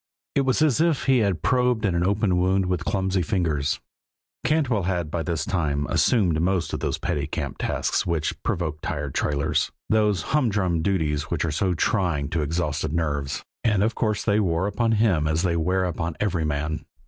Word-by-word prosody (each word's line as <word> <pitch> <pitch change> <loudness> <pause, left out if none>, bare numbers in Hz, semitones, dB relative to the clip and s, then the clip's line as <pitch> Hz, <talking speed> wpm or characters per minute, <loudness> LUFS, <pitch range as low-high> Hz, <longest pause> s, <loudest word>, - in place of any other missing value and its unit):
It 140 - +2
was 130 +4 +3
as 155 -1 +3
if 165 -4 +2
he 130 -2 +4
had 100 -8 0
probed 125 -3 +2
at 95 - +1
an 85 0 +1
open 100 -1 +1
wound 95 +1 +2
with 90 -1 -1
clumsy 95 -1 0
fingers. 80 -6 0 0.6
Cantwell 140 -9 +1
had 85 -5 -2
by 85 - -1
this 80 -2 -2
time 75 -6 0
assumed 90 -9 +2
most 90 0 0
of - - -2
those - - -1
petty - - -2
camp - - -4
tasks - - 0
which 85 -3 -2
provoke 80 -3 -2
tired 70 -2 -3
trailers, 75 +1 0 0.2
those 105 -5 +2
humdrum 100 - +1
duties 80 -5 0
which 85 -1 -1
are 80 - -1
so 90 +4 0
trying 85 -7 0
to 80 0 -1
exhausted 80 -1 -1
nerves, 70 -4 -2 0.2
and 105 -4 +2
of 115 +2 +1
course 110 -3 -1
they 105 -1 +3
wore 85 -3 +1
upon 115 +3 +1
him 100 -9 +2
as 80 +2 0
they 85 -2 +1
wear 90 +3 +1
upon 85 -2 -3
every 90 -6 0
man. 75 +1 -2
90 Hz, 185 wpm, -24 LUFS, 80-105 Hz, 0.6 s, he